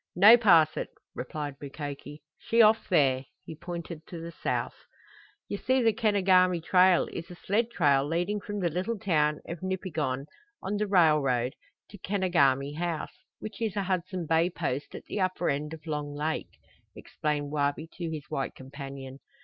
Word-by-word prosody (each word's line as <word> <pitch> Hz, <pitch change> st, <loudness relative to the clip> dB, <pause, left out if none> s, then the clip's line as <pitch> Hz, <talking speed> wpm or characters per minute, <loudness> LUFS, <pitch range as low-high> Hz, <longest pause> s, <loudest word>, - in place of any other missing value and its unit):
"No 205 Hz, +6 st, +9 dB
pass 170 Hz, -9 st, +5 dB
it," -, -, -3 dB, 0.2 s
replied 145 Hz, -3 st, -5 dB
Mukoki. 145 Hz, +1 st, -7 dB, 0.2 s
"She 230 Hz, -, 0 dB
off 215 Hz, +1 st, +4 dB
there." 135 Hz, -6 st, +3 dB, 0.2 s
He -, -, -7 dB
pointed 170 Hz, -1 st, -7 dB
to 170 Hz, -, -7 dB
the 165 Hz, +1 st, -7 dB
south. -, -, -2 dB, 0.7 s
"You 205 Hz, -, -3 dB
see 260 Hz, +4 st, +1 dB
the 225 Hz, -1 st, +4 dB
Kenogami 190 Hz, -5 st, +3 dB
trail 180 Hz, +1 st, +4 dB
is 165 Hz, -, -6 dB
a 180 Hz, -, -9 dB
sled 220 Hz, +6 st, 0 dB
trail 145 Hz, -, +3 dB
leading 175 Hz, +6 st, -1 dB
from 205 Hz, 0 st, -5 dB
the 175 Hz, -, +1 dB
little 190 Hz, +8 st, -2 dB
town 150 Hz, -6 st, +1 dB
of 170 Hz, +1 st, -6 dB
Nipigon, 160 Hz, -8 st, -2 dB, 0.4 s
on 205 Hz, +2 st, -2 dB
the 210 Hz, 0 st, -1 dB
railroad, 150 Hz, -9 st, +3 dB, 0.4 s
to 205 Hz, -, -11 dB
Kenogami 145 Hz, -9 st, +1 dB
House, 170 Hz, -2 st, -3 dB, 0.2 s
which 215 Hz, +2 st, -8 dB
is 220 Hz, -4 st, -1 dB
a 200 Hz, -, 0 dB
Hudson 185 Hz, -1 st, -2 dB
Bay 165 Hz, +2 st, +2 dB
Post 150 Hz, -6 st, -4 dB
at -, -, -9 dB
the -, -, -4 dB
upper 185 Hz, -3 st, 0 dB
end 150 Hz, +2 st, -3 dB
of 160 Hz, -1 st, -9 dB
Long 150 Hz, -2 st, -4 dB
Lake," 155 Hz, +2 st, -3 dB, 0.4 s
explained 145 Hz, -1 st, -3 dB
Wabi 145 Hz, +1 st, 0 dB
to 170 Hz, -2 st, -3 dB
his 155 Hz, -2 st, -5 dB
white 135 Hz, -1 st, -3 dB
companion. 135 Hz, 0 st, -9 dB
165 Hz, 165 wpm, -28 LUFS, 145-190 Hz, 0.7 s, No